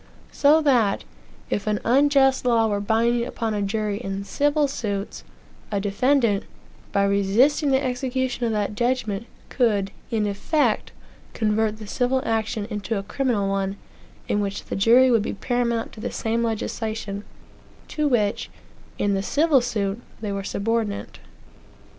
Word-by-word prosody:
So 300 +3 +4
that, 240 -8 +3 0.5
if 205 - -1
an 210 -1 +1
unjust 270 +1 +4
law 235 -2 +3
were 205 -2 0
binding 230 +3 +1
upon 230 -2 -3
a 205 - -1
jury 205 0 -1
in 195 -3 -4
civil 290 +6 +1
suits, 205 -7 -4 0.5
a 200 - 0
defendant, 210 +1 +2 0.5
by 200 - +2
resisting 205 +10 +3
the 265 +1 +2
execution 255 -1 -1
of - - -1
the 210 -1 -1
judgment, 235 -2 -1 0.2
could, 205 -6 +1 0.2
in 220 -3 0
effect, 210 +10 0 0.4
convert 215 0 +1
the 215 - -9
civil 255 +4 0
action 225 -1 -1
into 210 +1 -2
a 195 - -3
criminal 220 -2 0
one, 195 0 -1 0.5
in 205 - +1
which 200 0 -3
the - - -4
jury 240 +6 +5
would 230 -3 +4
be - - -3
paramount 235 +1 -1
to - - -12
the - - -3
same 230 +1 -1
legislation, 220 -2 -3 0.7
to 305 -1 0
which, 215 -6 0 0.5
in 205 0 +1
the 195 - 0
civil 290 +5 +3
suit, 210 -2 -2 0.2
they 210 -2 -4
were 200 0 -3
subordinate. 215 +1 -2
225 Hz, 145 wpm, -24 LUFS, 205-250 Hz, 0.7 s, jury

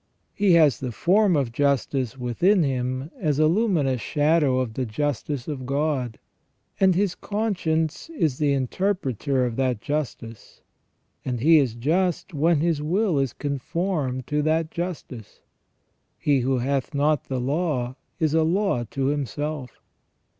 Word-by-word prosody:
He 200 -3 +3
has 155 -8 +5
the 130 -2 -4
form 190 - +3
of 135 -5 0
justice 135 -1 0
within 165 - +2
him 130 +1 -2
as 150 -8 0
a 155 - +4
luminous 160 - +1
shadow 150 -3 +2
of 125 -4 -2
the 130 - -2
justice 135 +2 -3
of 135 -5 -5
God, 140 -4 -1 0.6
and 190 -2 +4
his 195 -1 +1
conscience 185 - -2
is 150 - 0
the 145 -2 +2
interpreter 135 - 0
of 120 -2 -3
that 130 -4 0
justice; 120 -5 -5 0.6
and 125 -2 -3
he 160 +5 +6
is 125 -6 0
just 170 +8 0
when 155 +1 +2
his 165 -3 +1
will 175 +1 +1
is 135 -2 0
conformed 140 -2 -2
to 150 +1 0
that 155 +1 0
justice. 165 - -6 0.8
"He 145 -2 +2
who 130 +1 +1
hath 135 +2 -1
not 145 +1 +1
the 130 -1 -3
law 135 -2 -1 0.2
is 155 -2 +1
a 160 - +4
law 170 - +1
to 135 +4 -3
himself." 145 -1 -3
145 Hz, 145 wpm, -24 LUFS, 130-165 Hz, 0.8 s, he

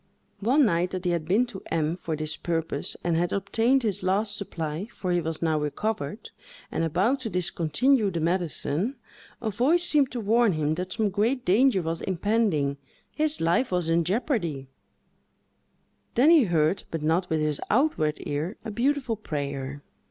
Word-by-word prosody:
One 255 +7 +4
night, 175 -3 +1
that 185 0 -5
he 175 - +2
had 170 -2 -1
been 205 +9 +3
to 220 -6 -9
M—— 160 0 0
for 165 -3 -4
this 155 0 -3
purpose, 165 -4 -1
and 170 -1 +1
had 175 +2 +1
obtained 230 +7 +2
his 210 -5 -1
last 200 +3 +1
supply, 165 -2 -4
for 185 - -3
he 175 0 +2
was 160 0 -4
now 160 -2 +2
recovered, 150 +4 -3 0.4
and - - -1
about 190 - +1
to 245 -4 -4
discontinue 180 - +1
the 170 -3 -3
medicine, 175 - -1 0.5
a 220 - 0
voice 290 - +2
seemed 295 -6 +3
to 245 - -2
warn 225 0 +3
him 155 -1 0
that 180 +3 -4
some 215 -2 0
great 230 +6 0
danger 200 +1 +4
was 165 0 -3
impending, 190 -7 0 0.3
his 310 0 -1
life 170 +9 +1
was 180 -2 0
in 165 +1 +3
jeopardy; 175 - -1 1.5
then 275 +7 +6
he 315 -7 +6
heard, 170 +1 +1
but 165 -2 -4
not 170 +4 +1
with 160 - +1
his 150 -1 -1
outward 210 - +2
ear, 155 +7 -3
a 220 - -4
beautiful 255 +1 0
prayer. 140 -6 -5
180 Hz, 170 wpm, -26 LUFS, 160-225 Hz, 1.5 s, then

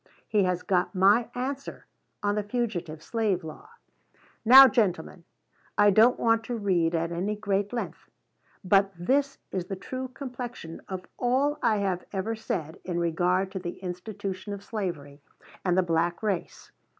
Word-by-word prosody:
He 205 -3 +2
has 180 -1 -1
got 185 +1 0
my 205 +6 +4
answer 270 +3 -5 0.4
on 205 0 +2
the 210 - 0
fugitive 200 -8 -3
slave 215 -6 0
law. 160 - -10 0.7
Now, 265 +4 +10
gentlemen, 185 -7 -1 0.5
I 205 0 +6
don't 225 +5 +5
want 225 0 +2
to 240 - -3
read 175 -5 +1
at 165 +1 -1
any 190 +5 -2
great 205 -1 -1
length; 240 -1 -5 0.5
but 195 +1 +3
this 275 +10 +1
is 185 -2 -2
the 195 - -4
true 255 +7 -5
complexion 245 - -7
of 185 -1 -5
all 275 +4 +1
I 225 -3 +3
have 190 -3 -1
ever 205 +3 -2
said 160 -7 -4
in 175 -2 -3
regard 180 +3 +1
to 190 - -4
the 175 -1 -6
institution 190 +2 -5
of 200 0 -8
slavery 170 -10 -5 0.4
and 180 -1 +1
the 185 - +4
black 170 +2 0
race. 200 -5 -3
195 Hz, 155 wpm, -27 LUFS, 175-225 Hz, 0.7 s, Now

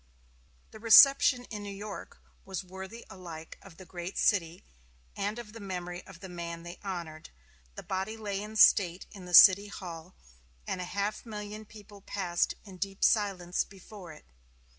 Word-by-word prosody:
The 220 - -12
reception 245 +3 +7
in 210 -2 -5
New 205 - -7
York 205 0 -8 0.3
was 190 -1 -5
worthy 190 +5 -10
alike 170 -5 -10
of 180 -4 -15
the 185 - -12
great 175 +2 -7
city 175 -4 +1 0.5
and 205 +3 -3
of 225 -3 -9
the 230 - -9
memory 180 -3 -6
of 185 -3 -13
the 190 - -8
man 170 -1 -7
they 175 +1 -9
honored. 170 -5 -6 0.5
The - - -8
body 195 +4 -3
lay 205 -2 -4
in 215 +1 -8
state 185 -4 +5
in 190 -3 -11
the 180 -1 +2
City 200 +2 +9
Hall, 175 -3 -9 0.5
and 180 - -3
a - - -4
half 200 +3 -3
million 210 -1 -7
people 205 -1 -14
passed 180 -3 -1
in 190 -3 -12
deep 195 +1 -4
silence 190 -5 +2
before 195 -2 -12
it. 155 - -15
195 Hz, 165 wpm, -30 LUFS, 175-210 Hz, 0.5 s, City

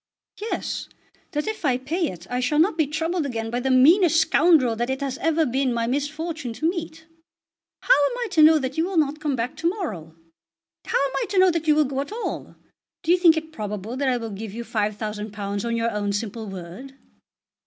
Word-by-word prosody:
"Yes; 435 +2 -4 0.4
that 295 0 -1
if 435 -3 -4
I 260 -5 +2
pay 320 +7 -1
it 175 -1 -8
I 250 - -2
shall 255 +4 0
not 325 +3 +3
be 315 -3 +1
troubled 325 +3 -1
again 225 -5 -4
by 240 - -1
the 265 +2 -1
meanest 325 +6 +5
scoundrel 300 -7 +4
that 240 +2 -2
it 265 0 -1
has 275 -2 -3
ever 325 0 +2
been 265 0 0
my 235 -1 0
misfortune 290 +1 -3
to 310 +8 -1
meet. 330 -2 -4 0.8
How - - +5
am 290 +12 +2
I 485 -1 -2
to 330 -5 +4
know 315 +1 +8
that 265 +1 -3
you 325 - +2
will 375 -1 -3
not 305 -1 +1
come 300 -3 -1
back 245 +3 -3
to 330 +1 +1
morrow? 205 - -5 0.7
How - - 0
am 275 -1 +1
I - - 0
to 400 - -2
know 370 0 +6
that 330 -1 -3
you 305 - +5
will 305 0 +4
go 270 0 -2
at 280 - -7
all? 460 +2 -5 0.5
Do 335 - +1
you 360 - +6
think 335 -3 +6
it 315 0 -4
probable 210 -2 -5
that 270 0 0
I 250 - +1
will 225 -2 -5
give 205 +1 -7
you 235 - -4
£5000 210 -1 -3
on 235 0 -1
your 230 0 0
own 205 -1 -2
simple 220 +1 -4
word?" 195 +9 -9
275 Hz, 220 wpm, -24 LUFS, 230-320 Hz, 0.8 s, know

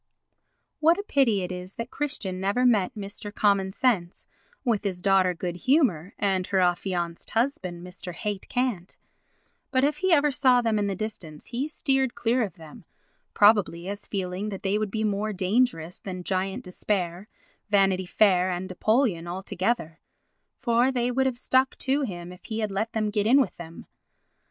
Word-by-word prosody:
What 330 +3 +4
a 405 - -3
pity 240 - +2
it 180 - -4
is 180 +1 -7
that 230 +2 -6
Christian 240 -11 -3
never 205 +6 +1
met 210 -7 +3
Mr. 205 0 -6
Common 200 -2 +2
Sense 195 -6 0 0.4
with 230 -5 +1
his 190 -3 -2
daughter, 190 -1 +3
Good 175 0 -4
Humour, 205 - +1
and 190 -3 0
her 195 - +1
affianced 175 -1 -1
husband, 185 -8 -1
Mr. 180 0 -8
Hate 205 +1 -4
Cant; 245 -8 -2 0.7
but 260 0 +1
if 295 +1 +2
he 375 +3 0
ever 295 -2 +4
saw 260 -3 +4
them 225 -3 +1
in 205 - 0
the 195 - -2
distance 180 -7 -6
he 255 +4 -3
steered 270 -5 0
clear 235 +1 +1
of 195 -6 -5
them, 160 -1 -13 0.5
probably 205 -5 +4
as 200 0 -6
feeling 190 +1 -3
that 195 -2 -7
they 200 +2 +1
would 215 -1 -1
be 220 +2 -2
more 210 0 -1
dangerous 185 -3 0
than 185 -2 -6
Giant 190 +1 -2
Despair, 180 0 -3 0.4
Vanity 195 -2 +3
Fair 185 -2 +3
and 185 +1 -3
Apollyon 215 -3 +1
all 185 +2 -5
together—for 230 +5 -2
they 245 -1 0
would 265 +2 +2
have 255 -2 -2
stuck 260 +1 +2
to 275 +2 +1
him 175 -8 -5
if 180 - -14
he 220 - -4
had 215 -2 -1
let 220 +4 -2
them 215 -2 0
get 210 0 0
in 265 +5 +6
with 270 - 0
him. 165 -1 -9
200 Hz, 175 wpm, -26 LUFS, 185-240 Hz, 0.7 s, in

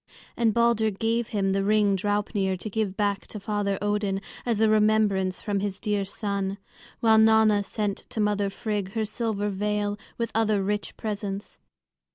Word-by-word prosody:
And 230 -2 +2
Balder 235 -1 +3
gave 225 +3 -1
him 195 -2 0
the 195 0 +1
ring 205 -1 +3
Draupnir 205 -1 0
to 215 - -6
give 200 -2 -1
back 205 -2 0
to 210 - -7
Father 200 -1 -1
Odin, 205 -1 0 0.3
as 230 -3 +1
a 220 - +4
remembrance 210 -3 +2
from 205 -2 0
his 195 -1 -3
dear 205 -2 -1
son; 200 0 -2 0.4
while 220 -1 +5
Nanna 220 -1 +5
sent 205 -1 -2
to - - -5
mother 205 -1 +1
Frigg 205 -1 -3
her 220 -1 0
silver 215 -2 -2
veil 205 +1 -1 0.2
with 230 -1 -2
other 215 -3 +2
rich 205 +1 -2
presents. 205 -2 -5
205 Hz, 165 wpm, -26 LUFS, 200-220 Hz, 0.4 s, while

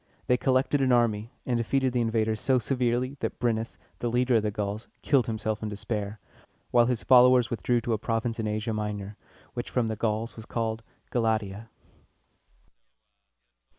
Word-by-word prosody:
They 125 - +3
collected 130 +2 +2
an 130 -1 +3
army, 115 -3 +2 0.2
and 125 -2 0
defeated 130 +2 +1
the 125 - +2
invaders 110 -1 0
so 130 -1 +3
severely 125 +2 0
that - - -3
Bren´nus, 115 -2 -1 0.2
the 120 - -1
leader 125 0 +3
of - - +2
the 105 - 0
Gauls, 105 +2 -4 0.2
killed 135 -6 +3
himself 110 -1 -2
in 110 - -3
despair, 105 0 -4 0.5
while 120 -1 +5
his 125 -2 -1
followers 125 -1 +6
withdrew 120 +1 +1
to 115 0 -1
a 110 - -1
province 115 +1 -2
in 110 - -1
Asia 110 +1 -2
Minor, 105 -1 -4 0.4
which - - -4
from 125 - +1
the 110 0 -2
Gauls 110 +1 -2
was 110 -1 -10
called 115 -1 -2 0.3
Ga 125 - +1
la´tia. 110 -2 -1
115 Hz, 170 wpm, -27 LUFS, 110-125 Hz, 0.5 s, followers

